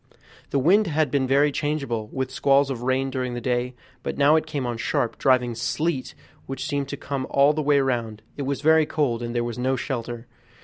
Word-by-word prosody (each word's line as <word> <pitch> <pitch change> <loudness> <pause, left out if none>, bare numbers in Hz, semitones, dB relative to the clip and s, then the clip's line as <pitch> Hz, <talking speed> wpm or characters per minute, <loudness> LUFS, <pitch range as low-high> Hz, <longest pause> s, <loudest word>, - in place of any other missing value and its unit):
The - - 0
wind 190 +10 +4
had 155 -3 +1
been 135 -2 +1
very 140 +3 +3
changeable, 140 -7 -2
with 130 +3 -4
squalls 140 0 +3
of 120 -3 -4
rain 130 +1 0
during 125 -2 -3
the - - -3
day, 125 +1 -1 0.3
but - - -4
now 145 +2 +5
it 160 0 +1
came 145 -4 -3
on 120 -1 -3
sharp, 115 0 -1
driving 125 -2 +3
sleet, 140 +4 -2 0.3
which 135 - -4
seemed 140 -1 -2
to 140 - -5
come 140 -1 -4
all 140 +2 +4
the 155 - -1
way 145 -1 +3
round; 115 -5 -2
it - - -5
was 140 0 -2
very 160 0 +4
cold, 130 -7 0
and 120 0 -4
there 120 - +1
was 120 0 -4
no 130 +2 +1
shelter. 120 -2 -4
135 Hz, 215 wpm, -24 LUFS, 120-145 Hz, 0.3 s, now